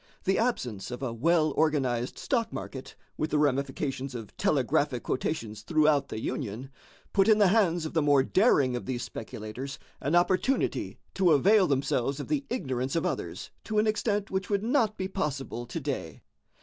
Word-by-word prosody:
The 195 - +2
absence 125 - -1
of 125 +2 -6
a 120 -3 -2
well 155 +4 +2
organized 135 -6 +1
stock 235 -5 -1
market, 135 0 -7 0.2
with 155 - -1
the 150 - +1
ramifications 135 -1 -1
of 115 -4 -8
telegraphic 140 -2 +1
quotations 115 -7 -3
throughout 150 +1 +3
the 110 - -4
Union, 125 +2 -4 0.4
put 195 0 +4
in 215 -1 +6
the 205 -3 +5
hands 175 -6 +2
of 155 - -5
the 160 - +2
more 145 -2 +4
daring 140 - +3
of 120 - -5
these 125 -2 -2
speculators 115 +5 -6 0.2
an 145 +5 0
opportunity 185 +9 +1 0.2
to 180 -4 +4
avail 190 +6 +5
themselves 135 0 0
of - - -6
the 285 -2 -1
ignorance 130 - -2
of 165 - 0
others 85 +1 -4
to 215 - -2
an 210 - +4
extent 210 -2 0
which 190 -1 -2
would 200 -1 0
not 230 -3 +1
be 190 - -2
possible 140 -9 -3
to 165 - -4
day. 130 - -5
145 Hz, 175 wpm, -28 LUFS, 130-190 Hz, 0.4 s, in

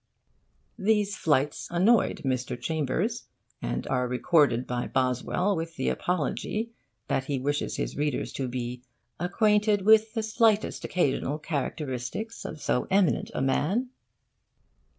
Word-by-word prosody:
These 205 0 +2
flights 145 -2 +1
annoyed 195 +6 +3
Mr. 130 -2 -1
Chambers, 160 - -1 0.3
and - - -2
are 125 -2 0
recorded 125 0 +3
by 125 0 -2
Boswell 130 +10 0
with 165 0 -4
the - - 0
apology 185 +6 -2 0.4
that 130 - 0
he 140 -1 -1
wishes 145 +3 -1
his - - -3
readers 145 -2 -1
to 135 - -2
be 125 0 -4 0.4
'acquainted 210 +2 +2
with 220 +2 +5
the 225 - 0
slightest 220 -1 +2
occasional 145 -3 0
characteristics 150 - -4
of 155 - -6
so 125 - 0
eminent 195 -3 +2
a 130 - 0
man. 185 - +1
160 Hz, 125 wpm, -27 LUFS, 130-210 Hz, 0.4 s, with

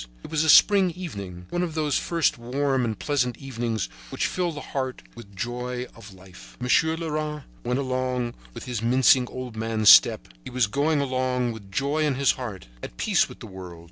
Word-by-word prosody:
It - - -10
was 160 -1 +1
a 160 - +1
spring 195 +3 +7
evening, 100 - -7
one 175 - -1
of 170 -3 -3
those 150 -3 +1
first 165 -7 0
warm 130 +1 0
and 110 -2 -3
pleasant 125 -5 -1
evenings 120 -6 -3 0.2
which - - -2
fill 180 -2 -1
the 150 - -9
heart 130 -2 -3
with 115 -4 -12
the 100 - -19
joy 125 +4 -4
of 110 -2 -12
life. 90 -11 -15
Monsieur 160 +6 +2
Leras 155 -2 -3 0.2
went 125 +1 -1
along 130 -2 -2 0.2
with - - -8
his 120 -4 -3
mincing 125 +1 +4
old 125 -2 -7
man's 110 -1 +2
step; - - +7 0.2
he - - -8
was 125 -2 +2
going 145 +7 +1
along 130 -2 0
with 100 -4 -11
joy 140 +8 -1
in 150 -3 +1
his 140 +1 +3
heart, 110 - -7 0.2
at - - -9
peace - - +2
with - - -13
the - - -7
world. 95 -4 -10
125 Hz, 200 wpm, -25 LUFS, 115-145 Hz, 0.2 s, spring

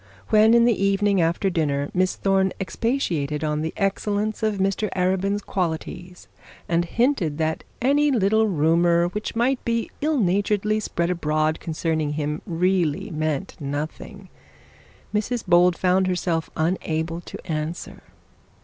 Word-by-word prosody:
When 215 +2 +6
in 235 0 +5
the 230 -5 +2
evening 195 -1 +2
after 170 +4 +1
dinner 145 -4 -1
Miss 185 0 +1
Thorne 195 -1 +1
expatiated 175 - -1
on 150 0 -1
the 160 +1 -2
excellence 205 +2 -1
of 215 -1 +1
Mr 195 +2 0
Arabin's 190 +2 0
qualities, 180 0 -4 0.4
she 170 0 +2
hinted 225 - +1
that 160 0 -1 0.2
any 290 +3 +3
little 220 -3 +3
rumour 170 0 +3
which 210 +4 -5
might 245 +3 +1
be 230 -1 -1
ill 305 0 +1
naturedly 205 +2 +1
spread 170 -4 -1
abroad 155 -2 0
concerning 160 -2 -2
him 150 +1 -3
really 175 -3 0
meant 155 +3 -2
nothing, 155 +7 -6 0.8
Mrs 220 +3 -1
Bold 175 0 +4
found 185 +1 +2
herself 175 -3 -1
unable 165 0 -1
to - - -9
answer. 160 0 -4
180 Hz, 130 wpm, -23 LUFS, 160-205 Hz, 0.8 s, When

